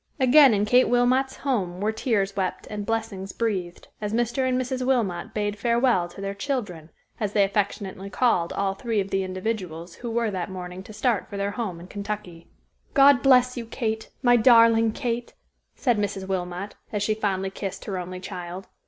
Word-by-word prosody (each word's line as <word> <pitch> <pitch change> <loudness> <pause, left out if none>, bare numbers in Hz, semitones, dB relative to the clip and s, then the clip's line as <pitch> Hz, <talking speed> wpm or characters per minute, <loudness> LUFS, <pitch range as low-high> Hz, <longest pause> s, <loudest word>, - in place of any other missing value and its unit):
Again 265 -1 +7
in 205 +1 +1
Kate 250 +4 +4
Wilmot's 255 +2 +2
home 195 -10 -2
were 210 +2 +1
tears 210 -4 0
wept 190 -2 -2
and 205 -1 -5
blessings 220 -4 -3
breathed, 190 -7 -3
as 210 0 -3
Mr. 240 +2 +1
and 255 0 +1
Mrs. 255 0 -2
Wilmot 225 -7 0
bade 205 -1 -2
farewell 235 -5 +2
to 175 - -13
their 195 0 -3
"children," 200 - -4 0.3
as 210 -2 -2
they 205 - +4
affectionately 195 -1 -2
called 185 -5 +1
all 195 -1 0
three 225 +2 -2
of 195 0 -3
the 195 - +1
individuals 185 -3 -4
who 240 - -7
were 230 -1 0
that 185 -1 -3
morning 180 0 -7
to 200 - -12
start 215 0 0
for 200 - -6
their 200 0 -1
home 205 -6 -4
in 170 - -10
Kentucky. 200 -4 -6 0.5
"God 275 -2 +7
bless 250 -2 +5
you, 235 -2 -5
Kate, 220 -2 -3
my 245 -1 +6
darling 230 -1 +6
Kate," 240 -1 -3 0.4
said 240 -5 +1
Mrs. 195 -2 -2
Wilmot 185 +1 -3 0.2
as 210 -1 -1
she 215 - +2
fondly 195 -3 -1
kissed 195 -1 -6
her 190 -3 -3
only 180 +1 -6
child. 185 0 -7
210 Hz, 185 wpm, -25 LUFS, 190-235 Hz, 0.5 s, Again